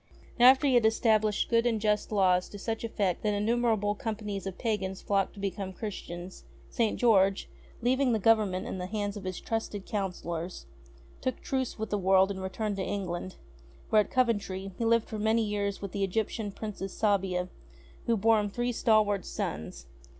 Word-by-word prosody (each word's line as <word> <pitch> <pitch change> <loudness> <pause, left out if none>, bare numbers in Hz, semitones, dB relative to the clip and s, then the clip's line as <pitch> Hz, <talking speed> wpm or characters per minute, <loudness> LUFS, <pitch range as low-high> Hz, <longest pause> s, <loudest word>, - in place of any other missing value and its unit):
Now, 245 +1 +9
after 265 +2 +5
that - - +4
he - - +2
had 240 -2 +4
established 220 -2 +2
good 230 0 +3
and 225 -2 +1
just 210 0 0
laws 185 -3 +3
to 205 - -9
such 225 +2 -3
eff^ect 200 -5 -1
that 210 -1 0
innumerable 220 -1 +1
companies 210 -3 -4
of 190 - -6
pagans 200 -5 -2
flocked 195 0 0
to - - -11
become 195 -1 -3
Christians, 185 -3 -7 0.3
St. 225 -2 0
George, 195 -5 +3 0.4
leaving 260 +1 +2
the 225 - +2
Government 210 -3 +2
in 190 - -5
the 180 - -4
hands 205 0 -3
of 200 -2 -8
his 185 -1 -4
trusted 220 -3 -3
counsellors, 180 -4 -4 0.6
took 255 -2 -2
truce 260 -2 -2
with 220 0 -4
the 205 - +1
world 190 +1 +4
and 190 -1 -5
returned 200 +2 -3
to 190 - -1
England, 185 -2 -4 0.6
where, 215 -1 +6
at - - -5
Coventry, 205 -6 0
he 230 - -2
lived 230 0 +3
for 215 - -5
many 220 +2 +2
years 205 -1 -2
with 200 - -4
the 200 +1 -2
Egyptian 210 +2 -1
Princess 195 -2 -6
Sabia, 190 -4 +1 0.6
who 230 -1 +3
bore 220 +2 +4
him 205 -1 -1
three 240 +4 -1
stalwart 215 -4 +2
sons. 80 +2 -5
205 Hz, 185 wpm, -29 LUFS, 190-225 Hz, 0.6 s, Now